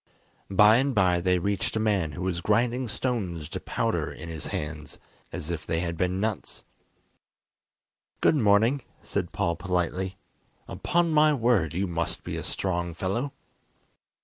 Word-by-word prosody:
By 105 +3 +7
and 135 0 +1
by 90 -4 +4
they 90 0 +3
reached 100 +6 -1
a - - +1
man 100 -8 +1
who 90 - -5
was 90 -2 -1
grinding 120 +5 +1
stones 100 - -2
to - - -4
powder - - -1
in 85 - -8
his 80 -2 -5
hands, 75 0 -5 0.3
as 80 - -5
if 80 -3 -3
they 80 0 -1
had 85 -1 -2
been 90 +2 0
nuts. 110 0 -3 1.5
"Good - - +4
morning," 115 +2 +4 0.2
said - - -2
Paul 85 - 0
politely; 90 +1 -1 0.5
"upon 170 -1 +1
my 155 0 +5
word, 115 - +2
you 95 +2 +1
must 85 -2 -3
be - - -4
a - - -3
strong 85 -3 -2
fellow!" 110 - -2
95 Hz, 150 wpm, -27 LUFS, 85-115 Hz, 1.5 s, By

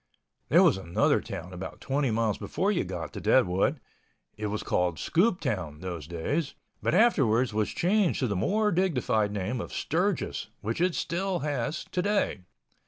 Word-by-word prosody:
There - - +6
was - - +4
another 90 -3 +1
town 90 +2 -7
about 90 +1 -7
20 140 0 0
miles 110 -2 0
before - - 0
you - - +1
got - - -6
to - - -6
Deadwood. 95 - +3 0.6
It 105 0 -3
was 105 +1 -3
called 90 -2 0
Scooptown 135 - 0
those 85 -5 -5
days, 135 - -2 0.3
but - - +1
afterwards 130 - +3
was 105 0 0
changed 195 0 +2
to 130 - +2
the 100 - -1
more 210 - +1
dignified 125 - +1
name 105 +4 -2
of - - -7
Sturgis, 180 +3 -1
which 110 +9 -2
it 180 -1 +2
still 180 +1 -1
has 145 0 -2
today. 200 - 0
125 Hz, 160 wpm, -28 LUFS, -, 0.6 s, There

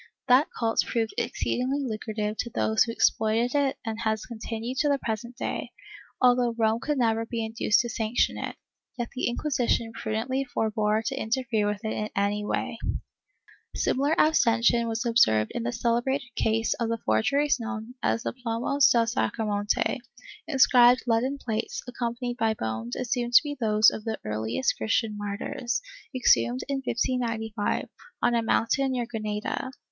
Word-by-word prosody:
That 260 +4 +5
cult 225 -1 0
proved 225 -2 -1
exceedingly 255 +3 -1
lucrative 215 -3 -3
to 235 - -2
those 220 -1 +2
who 230 - -4
exploited 225 +1 +2
it 280 -2 +1
and 225 0 -3
has 220 -2 -1
continued 230 +2 -5
to 295 - +2
the 285 - +3
present 235 0 -4
day, - - -3 0.5
although 245 -2 +3
Rome 225 0 +2
could 295 +3 -1
never 225 -2 +2
be 230 -1 -3
induced 220 -1 +2
to 240 - -4
sanction 225 +1 0
it, - - -5 0.4
yet 240 -1 -3
the 260 - -1
Inquisition 240 -3 0
prudently 235 +5 -2
forbore 220 -3 0
to 270 - -1
interfere 235 -3 0
with 210 +1 -3
it 220 - -1
in 215 0 -3
any 205 +1 0
way.^ - - -2 1.0
Similar 285 +4 +1
abstention 235 -5 +3
was 225 +2 -2
observed 110 - +3
in - - -2
the 120 +1 -2
celebrated 240 - -1
case 225 0 +1
of 230 -1 0
the 230 - 0
for 110 0 +3
geries 285 - +2
known 230 0 -5
as 230 - 0
the - - -2
Plomos 245 +3 +2
del 235 -1 +4
Sacromonte 210 -2 0 0.2
— 425 -5 -17
inscribed 250 -2 +6
leaden 245 +4 +1
plates, 225 -5 -3
accompanied 240 0 -3
by 220 -2 +1
bones 110 - -4
assumed 245 -1 -2
to - - +9
be 290 -1 -4
those 215 -2 +5
of 215 - -6
the 225 -1 -2
earliest 110 - -1
Christian 220 -1 0
martyrs, 205 +4 -3 0.4
exhumed 120 - +3
in 275 -1 -2
1595, 230 -3 -1 0.4
on 240 - +3
a 235 - +2
mountain 260 +4 +1
near 245 -2 -1
Granada. 215 +1 -3
230 Hz, 160 wpm, -27 LUFS, 220-250 Hz, 1.0 s, to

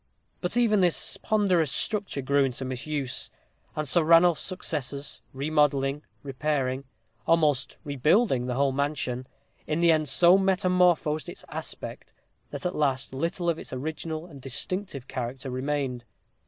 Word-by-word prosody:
But 180 +6 -2
even 215 -4 +4
this 175 -2 +3
ponderous 185 -9 +2
structure 200 -6 -1
grew 140 +1 +3
into 130 0 -2
disuse, 130 0 -3 0.5
and 155 -1 -2
Sir 170 +4 +4
Ranulph's 165 +1 +5
successors, 145 -6 -4
remodelling, 140 0 +1 0.2
repairing, 135 -1 -1 0.4
almost 150 -5 +2
rebuilding 145 - +2
the 125 - -2
whole 140 +1 +2
mansion, 130 -2 -2 0.4
in 155 +1 0
the 170 -1 +5
end 155 -2 +1
so 180 +5 +6
metamorphosed 180 -5 +2
its - - -10
aspect, - - -7 0.4
that - - -7
at 180 - 0
last 135 -4 0
little 170 +5 -2
of 165 -1 +1
its - - -8
original 155 +4 -4
and 145 -6 -12
distinctive 140 +1 -3
character 130 +2 -4
remained. 130 -1 -2
150 Hz, 135 wpm, -27 LUFS, 135-170 Hz, 0.5 s, so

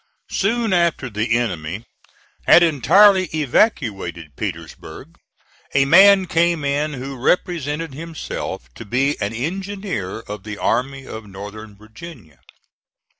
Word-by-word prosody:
Soon 225 +1 0
after 170 -7 +1
the 110 +3 0
enemy 95 -3 -3 0.6
had 175 - +8
entirely 185 +6 +5
evacuated 110 - 0
Petersburg, 85 -7 -8 0.6
a 135 0 +4
man 195 +5 +7
came 170 -3 +1
in 145 +2 -1
who 135 +1 -6
represented 150 +2 -1
himself 160 - -6
to - - -9
be 130 +7 0
an 100 +1 -1
engineer 175 - -4
of 105 -2 -8
the 105 +1 -7
Army 135 +4 -1
of 110 -4 -9
Northern 105 +2 -10
Virginia. 110 - -13
135 Hz, 115 wpm, -20 LUFS, 105-170 Hz, 0.6 s, had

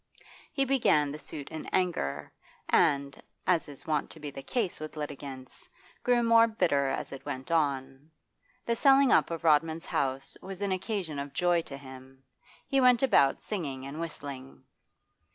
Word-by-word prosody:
He 275 - +1
began 230 - +3
the 150 - -7
suit 145 -2 -7
in 160 -1 -7
anger, 175 - -1 0.3
and, 140 -4 +2 0.2
as 175 -3 +2
is 145 -2 -10
wont 150 -2 -1
to 160 - -11
be 145 -1 -6
the 135 - -8
case 210 - -2
with 155 0 -7
litigants, 140 -3 -7 0.3
grew 245 -1 +3
more 230 0 +6
bitter 170 -11 +1
as 135 - -3
it 135 - -8
went 130 +4 -6
on. 140 -2 -1 0.6
The 235 - +1
selling 270 +2 +5
up - - +4
of 165 -1 -5
Rodman's 160 +1 +2
house 135 0 -2
was 190 -1 -7
an 200 -1 -1
occasion 185 -5 -2
of 140 0 -6
joy 175 -1 +2
to 140 -4 -8
him; 130 -1 -13 0.4
he 275 -1 +2
went 250 -1 +5
about 190 - +4
singing 140 -10 -4
and 140 +3 -7
whistling. 140 -5 -7
155 Hz, 165 wpm, -29 LUFS, 140-190 Hz, 0.6 s, more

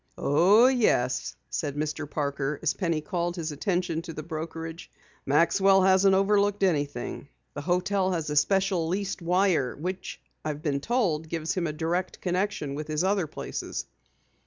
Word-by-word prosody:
"Oh, 190 - +5
yes," 225 - +2 0.2
said 145 -2 -2
Mr. 150 0 -3
Parker 145 -1 -2
as 155 - +2
Penny 165 -5 -1
called 175 -1 -2
his 165 -3 -3
attention 175 0 -1
to 165 -1 -8
the 155 - -6
brokerage. 165 +1 -6 0.4
"Maxwell 190 +6 +4
hasn't 190 +1 +5
overlooked 200 +1 +2
anything. 145 -6 -1 0.2
The 145 - -5
hotel 185 +3 +1
has 160 -3 -2
a - - -2
special 190 +2 +2
leased 195 +2 -2
wire 175 -6 +2
which 180 +5 -5 0.2
I've 150 -1 -4
been 140 -3 0
told 165 - 0
gives 160 -1 -2
him 175 -3 -1
a - - -2
direct 170 +4 -2
connection 180 -5 -1
with 150 +1 -5
his 155 +2 -1
other 190 -3 +1
places." - - -5
170 Hz, 155 wpm, -27 LUFS, 150-190 Hz, 0.4 s, Oh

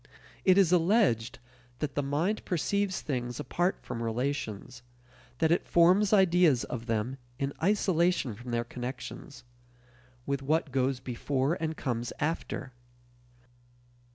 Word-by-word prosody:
It 185 0 +6
is 190 -4 +5
alleged 170 - +3 0.4
that 145 -1 -3
the 145 - 0
mind 155 +10 -1
perceives 195 +2 -1
things 125 -3 -3
apart 175 +6 0
from 120 -2 -5
relations; 120 -1 -3 0.6
that 160 +3 +2
it 170 - +1
forms 185 +4 +4
ideas 175 - +4
of 120 -1 -6
them 115 +4 -1 0.2
in 140 0 -2
isolation 180 - +2
from 120 +4 -10
their 120 0 0
connections 125 +3 -7 0.8
with 140 -1 -1
what 155 +1 0
goes 130 0 +1
before 130 +3 -1
and 160 -2 -3
comes 120 -3 -2
after. 150 -4 -3
140 Hz, 125 wpm, -29 LUFS, 125-175 Hz, 0.8 s, It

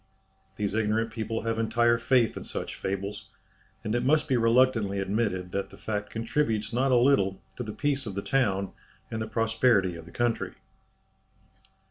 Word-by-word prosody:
These 100 -1 -2
ignorant 110 +1 +1
people 115 0 -3
have 115 0 -1
entire 120 +1 +3
faith 120 -1 +3
in - - -6
such - - -4
fables, 100 +1 -4 0.5
and 110 -1 -2
it 120 0 +1
must 150 +4 +3
be 135 - +2
reluctantly 115 -3 +3
admitted 95 -2 -1
that 100 +1 -2
the - - -14
fact 105 -1 -3
contributes 115 -2 -1
not 130 +3 +2
a 125 - +5
little 120 -7 +3 0.2
to - - -4
the 110 - -5
peace 140 0 -1
of 100 - -5
the 100 - -3
town 100 -8 +1 0.4
and 110 - -3
the 110 - -3
prosperity 110 -4 +2
of 85 -1 -9
the 85 - -13
country. 120 +2 -1
115 Hz, 170 wpm, -28 LUFS, 100-120 Hz, 0.5 s, a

